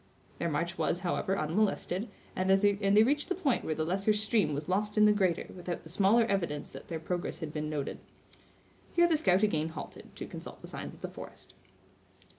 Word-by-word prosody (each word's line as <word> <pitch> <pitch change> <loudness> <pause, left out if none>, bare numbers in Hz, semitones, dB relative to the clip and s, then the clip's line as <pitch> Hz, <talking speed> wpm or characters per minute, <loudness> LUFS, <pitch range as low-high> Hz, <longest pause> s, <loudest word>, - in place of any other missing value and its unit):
Their 170 - 0
march 170 +4 -2
was, 175 - +1
however, 190 +2 0
unmolested, 195 +4 0 0.3
and 185 +1 0
they 200 +1 +5
reached 290 - +1
the 370 - +1
point 290 -9 +1
where 155 - -1
the 155 - -1
lesser 195 +5 +2
stream 210 -4 +1
was 150 +1 -4
lost 210 +3 0
in 210 - +7
the 210 - +6
greater, 185 -5 +1
without 180 -1 -5
the 160 - -10
smallest 205 +6 +4
evidence 170 -7 -1
that - - -10
their 165 -2 -4
progress 175 +2 -3
had 155 -3 -6
been 150 0 -2
noted. 145 -3 -3 1.0
Here 345 0 +6
the 330 - +3
scout 195 - +3
again 160 -6 +1
halted, 160 - -9
to - - -6
consult - - -9
the - - -9
signs - - -6
of - - -19
the - - -3
forest. - - -11
190 Hz, 200 wpm, -31 LUFS, 165-210 Hz, 1.0 s, in